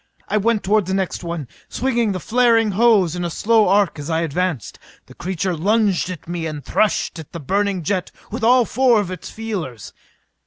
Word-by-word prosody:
I 215 - 0
went 215 +1 +1
toward 205 -1 +2
the 190 - 0
next 190 -2 -2
one, 170 -5 -4 0.2
swinging 240 -4 0
the 185 - -3
flaring 230 +1 +3
hose 200 -5 +3
in 175 - -3
a 175 - -1
slow 220 +5 +2
arc 200 -5 +2
as 145 +2 -6
I 160 0 +1
advanced. 165 - -2 0.3
The - - -15
creature 185 0 -2
lunged 200 +1 +1
at 180 -3 -8
me 170 -1 -3
and 150 -2 -7
threshed 210 -5 0
at 160 - -11
the 170 - -5
burning 195 +4 -1
jet 185 +3 -1 0.2
with 230 +2 -5
all 245 +1 +5
four 245 0 +3
of 190 -3 -3
its 185 - -7
feelers. 180 - -6
190 Hz, 195 wpm, -20 LUFS, 170-220 Hz, 0.3 s, all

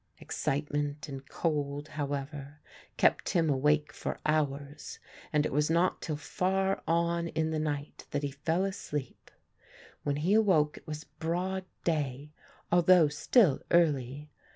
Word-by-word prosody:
Excitement 145 +1 -2
and 135 -2 -8
cold, 145 -2 -2
however, 145 0 -4 0.4
kept - - +3
him 165 -4 +2
awake 150 +2 +2
for - - -4
hours 145 -1 -1 0.3
and 150 -1 +2
it - - -2
was 150 +2 +2
not 170 +3 +2
till 155 -3 -3
far 190 +5 0
on 170 0 +1
in 160 0 -1
the 155 - -1
night 145 -1 -4
that 145 0 -2
he 140 - -1
fell 160 +7 0
asleep. 150 -9 -5 0.7
When 145 -1 -1
he 165 +7 +1
awoke 185 -9 +4
it - - -15
was 155 0 -5
broad 180 +5 -3 0.2
day, 145 -3 -1 0.4
although 175 -2 +6
still 165 - +3
early. 145 -3 +2
150 Hz, 135 wpm, -30 LUFS, 145-170 Hz, 0.7 s, although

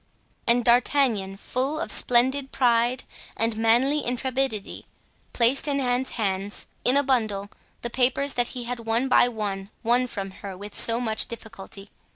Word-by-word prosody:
And 240 0 +3
D'Artagnan, 235 -5 +2
full 265 +8 -2
of 340 - -2
splendid 265 +3 +3
pride 240 0 +2 0.3
and 225 0 +1
manly 240 +7 +2
intrepidity, 250 -3 -2 0.4
placed 250 +5 +3
in 280 -1 +1
Anne's 250 0 0
hands, 200 -2 -1 0.2
in 255 +3 +4
a 285 - +3
bundle, 215 -7 -1 0.3
the 235 - -3
papers 265 +3 +1
that 245 -1 +1
he 245 - -4
had 245 0 -5
one 230 +3 0
by 255 - +5
one 200 -4 -4
won 245 +2 +2
from 195 -4 -5
her 195 -2 -7
with 205 +2 -9
so 230 0 +1
much 220 -3 -1
difficulty. 200 -3 -9
240 Hz, 155 wpm, -25 LUFS, 215-260 Hz, 0.4 s, by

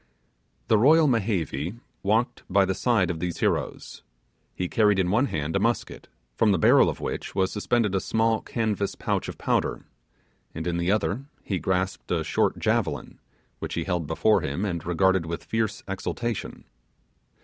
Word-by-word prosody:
The 110 - +4
royal 155 +6 +6
Mehevi 95 - -1 0.2
walked 115 +5 +1
by 100 +1 +4
the 95 - 0
side 100 -3 +2
of 80 - -5
these 90 0 -3
heroes. - - -2 0.5
He 90 - -2
carried 105 +1 +3
in 90 -1 +1
one 120 +7 +3
hand 80 - -3
a - - +3
musket, - - -1 0.3
from 110 -2 +3
the 95 - +3
barrel 80 - +5
of - - -5
which - - -5
was 95 -1 +1
suspended 105 -1 0
a 95 - +2
small 110 +3 +1
canvas 105 -4 -2
pouch - - -2
of - - -7
powder, - - -1 0.7
and 80 +1 -4
in 85 -1 -1
the 85 +2 +1
other 105 +4 0 0.2
he 95 -3 -2
grasped 95 +3 -2
a - - 0
short - - +1
javelin, - - -1 0.4
which - - -4
he 85 - -1
held 90 -3 -2
before 105 +7 +3
him 70 +9 -2
and 85 -4 -3
regarded 95 0 +2
with 85 0 -4
fierce 110 -2 -2
exultation. 110 +3 -4
95 Hz, 170 wpm, -26 LUFS, 90-110 Hz, 0.7 s, royal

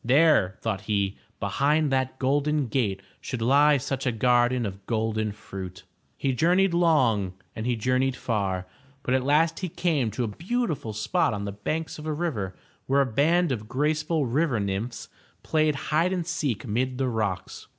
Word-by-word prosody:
There, 135 - +4
thought 105 -4 -2
he, 100 -2 +1 0.2
behind 140 +9 +1
that 130 0 0
golden 145 +2 +1
gate 105 -5 -1 0.2
should 125 - -4
lie 140 +5 +5
such 135 0 -3
a - - +3
garden 120 +1 +2
of 100 -1 -6
golden 110 -1 0
fruit. 95 -3 -8 0.3
He 135 -1 0
journeyed 180 +7 +3
long 130 - +3 0.2
and 110 +2 -3
he 125 - +1
journeyed 130 +3 +1
far, 95 -7 -1 0.4
but 125 - 0
at 130 -1 +2
last 150 +4 +2
he 185 - -3
came 155 -8 0
to 115 +4 -2
a - - -1
beautiful 165 - -2
spot 130 - +1
on 100 0 -4
the 100 - -3
banks 155 +12 -4
of 155 - -7
a 155 - 0
river, 125 - -2 0.3
where 140 +1 +4
a - - +3
band 155 +7 +2
of 110 -4 -4
graceful 155 +3 0
river 130 0 +1
nymphs 100 +4 -3 0.4
played 155 -2 +2
hide 155 +5 +1
and 180 -3 -1
seek 155 - -2
mid 125 +3 -1
the 135 0 0
rocks. 110 -6 -3
130 Hz, 170 wpm, -26 LUFS, 110-155 Hz, 0.4 s, lie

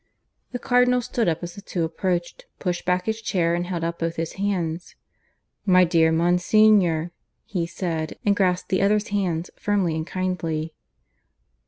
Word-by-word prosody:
The 245 - -3
Cardinal 250 0 +3
stood 230 -1 -1
up 165 +1 -2
as 175 0 -5
the 200 - -10
two 175 -3 -3
approached, 175 - -2
pushing 175 -2 -3
back 180 0 +1
his 220 0 -2
chair, 175 -6 +1
and 175 +1 -1
held 175 -2 -3
out 170 0 -3
both 165 0 -2
his 165 -1 -3
hands. 180 -4 -3 0.7
"My 185 -2 +5
dear 165 -2 +3
Monsignor," 175 0 +3 0.3
he 175 -4 -2
said, 165 -2 -3
and 205 -1 +3
grasped 180 -2 +1
the 185 - +1
other's 210 +2 +2
hands 180 -4 -1
firmly 200 -5 0
and 160 +1 -3
kindly. 165 -4 -2
180 Hz, 160 wpm, -24 LUFS, 165-200 Hz, 0.7 s, My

